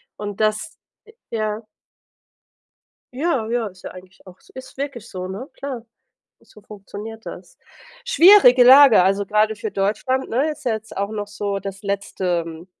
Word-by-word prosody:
und 205 -1 -7
das, 215 +9 -1 0.3
e 445 - -17 0.2
ja. 215 -1 -2 1.5
Ja, 270 -6 -1
ja, 235 -1 -1
ist 185 -2 -12
ja - - -6
eigentlich 185 +1 -15
auch 185 0 -14 0.2
ist 260 +1 -12
wirklich 275 -6 -5
so, 185 -2 -7
ne, 205 +8 -7
klar, 265 -4 -6 0.6
so 210 - -19
funktioniert 210 +2 -10
das. - - -10 0.5
Schwierige 370 - +7
Lage, 265 -5 +8
also 195 +2 +1
gerade 215 +2 +1
für 220 -1 -5
Deutschland, 215 +7 -1
ne, 275 +7 0
ist 300 -2 -11
ja 235 - +1
jetzt 220 0 -8
auch 200 +1 -2
noch 205 -1 -5
so 200 -1 -4
das 195 +1 -8
letzte 180 -4 -3
215 Hz, 155 wpm, -21 LUFS, 195-255 Hz, 1.5 s, Lage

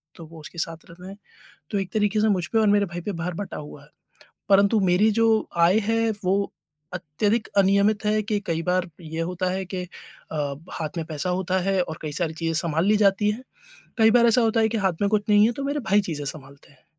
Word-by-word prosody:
तो 165 - -11
वो 165 0 -13
उसके 170 - -11
साथ 165 0 -2
रहते 180 +2 -12
हैं, 195 +1 -10 0.5
तो 200 - 0
एक 190 - -4
तरीके 210 0 +1
से 220 - +3
मुझ 180 -4 +1
पे 225 - -1
और 215 - +3
मेरे 205 0 +3
भाई 175 -1 -7
पे 205 - -4
भार 180 0 -3
बँटा 205 +1 -6
हुआ 145 -1 -10
है। 145 - -20 0.6
परंतु 200 +2 +4
मेरी 190 +5 +4
जो 225 - +4 0.3
आय 175 +5 +5
है 225 0 +2
वो 195 +2 0 0.4
अत्यधिक 205 +7 -1
अनियमित 200 +2 +3
है 215 0 +2
कि 210 -1 -1
कई 165 -1 -1
बार 180 0 0
ये 160 +1 -5
होता 180 0 -2
है 190 +1 -2
कि 185 -1 -4
अ, 150 -4 -7 0.2
हाथ 155 +1 -5
में 160 - -2
पैसा 160 +3 -3
होता 185 +1 0
है 195 -1 +2
और 160 0 -6
कई 150 -1 -4
सारी 160 0 -2
चीज़ें 165 0 -2
सँभाल 160 +3 0
ली 215 +1 +4
जाती 205 0 +3
हैं, 230 +5 -5 0.6
कई 220 0 +6
बार 235 -1 +5
ऐसा 235 +2 +4
होता 225 0 +2
है 220 - +3
कि 225 - -1
हाथ 185 - +2
में 200 - +3
कुछ 210 -1 +1
नहीं 210 +1 +6
है, 240 - +1
तो 275 +3 -6
मेरे 285 +1 -1
भाई 205 +1 +5
चीज़ें 145 -2 -4
सँभालते 140 0 -9
हैं, 130 - -27
190 Hz, 235 wpm, -24 LUFS, 165-210 Hz, 0.6 s, कई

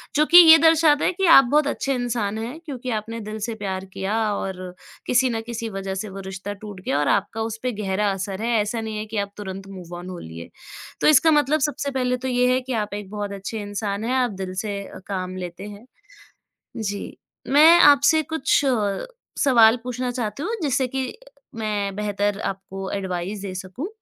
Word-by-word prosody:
जो 300 - +4
कि 345 - +7
ये 320 -2 +10
दर्शाता 320 -2 +4
है - - +3
कि 385 +2 0
आप 270 -5 +8
बहुत 300 0 +3
अच्छे 275 -1 -1
इंसान 230 -4 -2
हैं 240 +8 -5
क्योंकि 255 -4 -6
आपने 225 +1 -4
दिल 215 +1 -6
से 225 +2 -3
प्यार 190 -3 -4
किया 195 +3 -2 0.2
और 185 -2 -5 0.3
किसी 255 +1 +3
ना 225 - -2
किसी 230 0 -5
वज़ह 195 -1 -5
से 200 +2 -4
वो 195 - -8
रिश्ता 195 +1 -6
टूट 205 -1 -10
गया 140 - 0
और 145 - 0
आपका 205 +3 0
उस 225 0 -4
पे 250 - 0
गहरा 200 +1 0
असर 195 +1 -5
है, 235 - -1
ऐसा 220 +2 -3
नहीं 220 -1 -5
है 215 - -4
कि 220 0 -6
आप 200 0 -2
तुरंत 195 -1 -7
मूव 180 -3 -10
ऑन 180 +1 -8
हो 180 - -7
लिए। 80 +1 -9 0.5
तो - - +3
इसका 310 +2 +6
मतलब 300 +1 +3
सबसे 285 -1 -3
पहले 250 -1 0
तो 260 +1 -5
ये 250 0 +2
है 255 - +2
कि 255 0 -5
आप 210 -3 -2
एक 205 -2 -6
बहुत 205 -1 -4
अच्छे 200 +3 -5
इंसान 205 0 -4
हैं, 250 - -1
आप 250 -3 +1
दिल 190 -1 -6
से 205 -2 -3 0.3
काम 185 -2 -4
लेते 180 +1 -7
हैं, 205 +3 -12 0.9
जी। 205 -2 -5 0.3
मैं 315 +5 +7
आपसे 290 +1 +6
कुछ 320 -3 +2 0.8
सवाल 235 -4 +6
पूछना 250 0 -3
चाहती 245 +3 -4
हूँ 455 +5 -2
जिससे 265 -2 +1
कि 265 0 -3 0.4
मैं 205 -3 -2
बेहतर 205 -1 -1
आपको 195 0 -5
एडवाइज़ 190 +1 -4
दे 185 - -6
सकूँ, 190 - -6
215 Hz, 200 wpm, -23 LUFS, 195-255 Hz, 0.9 s, ये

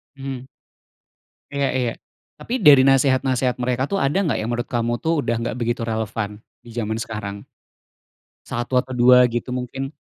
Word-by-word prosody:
Mhm. 135 -2 -6 1.1
Iya 140 -1 0
iya, 125 -3 0 0.5
tapi 240 - -6
dari 140 -3 +8
nasehat-nasehat 130 -2 +2
mereka 125 +1 0
tuh 195 - +1
ada 140 +5 0
nggak 160 - 0
yang 110 - -3
menurut 120 0 -3
kamu 120 -1 0
tuh 160 -1 +1
udah 120 -4 0
nggak 115 - -3
begitu 120 0 -1
relevan, 110 -2 -3 0.2
di 120 - -14
zaman 110 -2 -2
sekarang? 105 -3 -6 1.0
1 120 +2 -4
atau 130 - -5
2 125 +1 +6
gitu 120 +1 -3
mungkin? 135 +3 -5
125 Hz, 155 wpm, -22 LUFS, 115-135 Hz, 1.1 s, dari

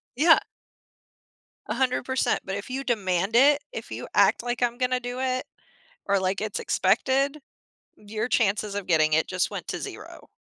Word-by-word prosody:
Yeah. 320 +5 +6 1.3
100%. 260 0 0
But 190 - -3
if 200 +4 -6
you 265 +2 -3
demand 200 -4 0
it, 285 +3 +6
if - - -8
you - - -6
act - - +4
like 245 0 -3
I'm 240 -1 +1
gonna 255 0 0
do 245 0 -5
it, 255 -1 -1 0.6
or 200 0 +2
like, 190 +1 -1
it's 215 -1 -3
expected, 265 +9 +1 0.6
your 215 +3 -4
chances 210 -3 +1
of 205 -2 -4
getting 155 -2 +3
it 160 - +2
just 185 -1 -1
went - - -6
to - - -3
0. - - -9
240 Hz, 160 wpm, -25 LUFS, 195-260 Hz, 1.3 s, Yeah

